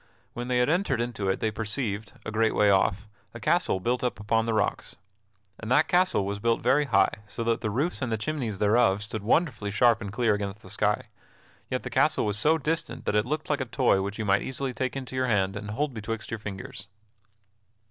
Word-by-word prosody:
When 120 0 -5
they 125 -1 +1
had 125 - +3
entered 165 -5 +1
into 115 -5 -2
it 95 - -1
they 110 - +1
perceived, 105 -1 -3
a 110 - -4
great 110 0 +1
way 105 -1 +4
off, 100 +2 +2 0.3
a - - -6
castle 95 - +1
built 120 +6 -1
up 125 - -1
upon 110 +2 +1
the 115 - +1
rocks. 105 -1 -1 0.6
And 115 - -6
that 145 +5 +4
castle 180 - +2
was 100 +1 -3
built 115 +2 0
very 135 +5 +3
high, 100 -6 +2
so 115 - -4
that 115 0 0
the 110 - -1
roofs 140 +12 -1
and 125 -3 -2
the 110 - +1
chimneys 115 -3 -3
thereof 105 -1 +3
stood 105 0 -4
wonderfully 115 - +1
sharp 115 +2 +3
and 100 -3 -5
clear 115 0 +2
against 100 0 -4
the - - -11
sky; - - 0 0.6
yet - - -2
the - - -6
castle - - +2
was 105 0 +1
so 155 +7 +4
distant 160 +2 -2
that - - 0
it 105 +2 +2
looked 155 +3 -2
like 145 -2 0
a - - -1
toy 100 -4 +2
which 100 +2 -4
you 110 - -3
might 100 0 +3
easily 130 0 -3
take 130 +2 -2
into 130 -1 -5
your 130 0 +1
hand 95 -4 +1
and 105 0 -6
hold 140 +6 -2
betwixt 110 0 -5
your 115 - -3
fingers. 100 0 -8
115 Hz, 225 wpm, -27 LUFS, 105-130 Hz, 0.6 s, way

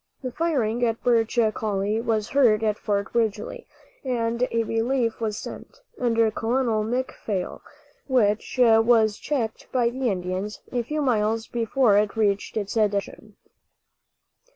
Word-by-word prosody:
The 255 - -3
firing 245 -7 0
at 230 -1 0
Birch 230 -1 +2 0.2
Coulie 210 +1 -1
was 220 -3 -1
heard 235 -6 +3
at 210 -1 0
Fort 200 -1 -2
Ridgely, 220 -3 -2 0.4
and 240 -1 0
a 230 0 0
relief 230 +1 -1
was 215 -2 -2
sent, - - -9 0.2
under 230 -2 +2
Colonel 225 -1 0
McPhail, 220 -5 -3 0.5
which 220 -4 +1
was 225 -2 +4
checked 240 -7 -3
by 240 -2 +2
the 255 0 -1
Indians 185 +2 -3
a 245 - 0
few 300 +5 -2
miles 225 -3 +1
before 230 -2 +2
it 210 0 -1
reached 205 -1 0
its 205 -2 -3
destination. 210 -1 -1
225 Hz, 130 wpm, -24 LUFS, 210-245 Hz, 0.5 s, was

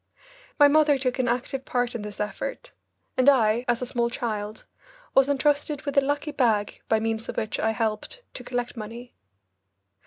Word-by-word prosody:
My 290 - +8
mother 295 -1 +4
took 255 -1 -1
an 250 - +2
active 255 +2 -1
part 245 -1 -1
in 235 - -4
this 210 0 -8
effort, 215 - -4 0.5
and 260 +2 +6
I, 235 -3 +3
as 240 0 +1
a - - -1
small 235 -1 0
child, 215 -4 -4 0.5
was 270 +1 +5
entrusted 290 +1 +1
with 285 -2 -3
a 280 - +6
lucky 290 +2 -1
bag 225 -7 +1
by 220 - +4
means 225 0 -2
of - - -5
which 220 - -2
I 220 - +2
helped 220 - -2
to 250 - -5
collect 245 -1 -3
money. 235 +2 -8
245 Hz, 180 wpm, -26 LUFS, 220-275 Hz, 0.5 s, My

